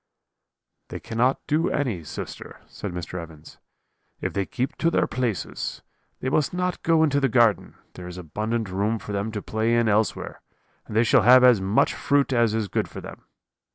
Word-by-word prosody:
"'They -, -, -7 dB
cannot 120 Hz, +3 st, 0 dB
do 155 Hz, +2 st, +1 dB
any, 120 Hz, -, -2 dB
sister,' -, -, -8 dB
said -, -, -7 dB
Mr. 90 Hz, 0 st, -5 dB
Evans, 80 Hz, -2 st, -13 dB, 0.6 s
'if -, -, -3 dB
they 100 Hz, -1 st, -1 dB
keep 130 Hz, +1 st, -3 dB
to 165 Hz, -, +1 dB
their -, -, +2 dB
places. 120 Hz, -6 st, -3 dB, 0.4 s
They 130 Hz, -, -1 dB
must 150 Hz, +4 st, 0 dB
not 180 Hz, 0 st, -2 dB
go 165 Hz, -1 st, +3 dB
into 140 Hz, -2 st, +2 dB
the 135 Hz, -1 st, +1 dB
garden, 115 Hz, -3 st, +2 dB, 0.2 s
there 90 Hz, -, -9 dB
is 90 Hz, 0 st, -8 dB
abundant 110 Hz, +6 st, -3 dB
room 105 Hz, +4 st, 0 dB
for 105 Hz, -, -8 dB
them 100 Hz, +2 st, -2 dB
to 105 Hz, -2 st, -5 dB
play 110 Hz, +2 st, 0 dB
in 120 Hz, -1 st, +2 dB
elsewhere, 110 Hz, +1 st, 0 dB, 0.5 s
and 105 Hz, -, -7 dB
they 115 Hz, -, +5 dB
shall 115 Hz, -, +4 dB
have 125 Hz, +2 st, +7 dB
as 125 Hz, -6 st, +6 dB
much 95 Hz, +3 st, +2 dB
fruit 140 Hz, -1 st, +1 dB
as 115 Hz, -3 st, +2 dB
is 110 Hz, -2 st, -1 dB
good -, -, -1 dB
for -, -, -9 dB
them. -, -, -11 dB
115 Hz, 190 wpm, -24 LUFS, 100-130 Hz, 0.6 s, have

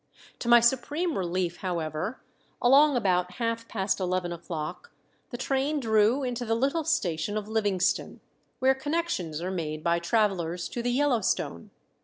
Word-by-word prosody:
To -, -, -5 dB
my 240 Hz, 0 st, +9 dB
supreme 290 Hz, +8 st, +1 dB
relief, 175 Hz, -1 st, -1 dB
however, 170 Hz, -, -3 dB, 0.4 s
along 275 Hz, +2 st, +5 dB
about 180 Hz, -4 st, +1 dB
half 230 Hz, +2 st, -2 dB
past 195 Hz, -2 st, -1 dB
eleven 180 Hz, -1 st, -1 dB
o'clock 170 Hz, -, -6 dB, 0.4 s
the 240 Hz, -, -6 dB
train 270 Hz, +3 st, 0 dB
drew 225 Hz, +2 st, +3 dB
into 245 Hz, -1 st, -2 dB
the 225 Hz, -1 st, 0 dB
little 280 Hz, +7 st, 0 dB
station 205 Hz, -, -1 dB
of 210 Hz, -1 st, -4 dB
Livingston, 205 Hz, -4 st, 0 dB, 0.4 s
where 265 Hz, +1 st, +4 dB
connections 265 Hz, -, -2 dB
are 185 Hz, -, -2 dB
made 155 Hz, -4 st, -4 dB
by 170 Hz, 0 st, +2 dB
travelers 175 Hz, -2 st, 0 dB
to 240 Hz, -, -4 dB
the 245 Hz, -, -1 dB
Yellowstone. 245 Hz, -, 0 dB
215 Hz, 145 wpm, -27 LUFS, 175-260 Hz, 0.4 s, my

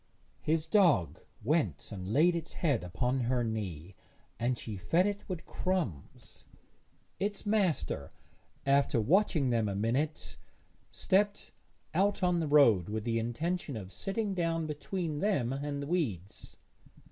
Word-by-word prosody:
His 155 Hz, 0 st, +1 dB
dog 170 Hz, -, +3 dB, 0.2 s
went 150 Hz, +2 st, 0 dB
and 95 Hz, -1 st, -5 dB
laid 170 Hz, +7 st, +4 dB
its 165 Hz, -1 st, -4 dB
head 140 Hz, -, 0 dB
upon 125 Hz, +9 st, -1 dB
her 125 Hz, 0 st, +1 dB
knee, 95 Hz, -6 st, -4 dB, 0.5 s
and 120 Hz, +1 st, 0 dB
she 110 Hz, -2 st, -6 dB
fed 130 Hz, -, +2 dB
it 205 Hz, 0 st, -2 dB
with 180 Hz, -3 st, -5 dB
crumbs; 165 Hz, -, -3 dB, 0.8 s
its 205 Hz, +2 st, -2 dB
master, 175 Hz, -, 0 dB, 0.5 s
after 140 Hz, -3 st, +3 dB
watching 155 Hz, -, +3 dB
them 115 Hz, -3 st, +1 dB
a 100 Hz, -, -3 dB
minute, 125 Hz, +9 st, -1 dB, 0.5 s
stepped 205 Hz, +2 st, +1 dB, 0.4 s
out 195 Hz, +3 st, +1 dB
on 180 Hz, -1 st, +3 dB
the 160 Hz, -, -1 dB
road 120 Hz, -, +5 dB
with 110 Hz, 0 st, -3 dB
the 115 Hz, 0 st, 0 dB
intention 145 Hz, +5 st, -2 dB
of 95 Hz, -2 st, -8 dB
sitting 200 Hz, +1 st, -2 dB
down 165 Hz, -3 st, 0 dB
between 155 Hz, +1 st, -3 dB
them 145 Hz, -, +1 dB
and 140 Hz, +1 st, -3 dB
the -, -, -6 dB
weeds. 115 Hz, -, -3 dB
145 Hz, 135 wpm, -31 LUFS, 110-175 Hz, 0.8 s, road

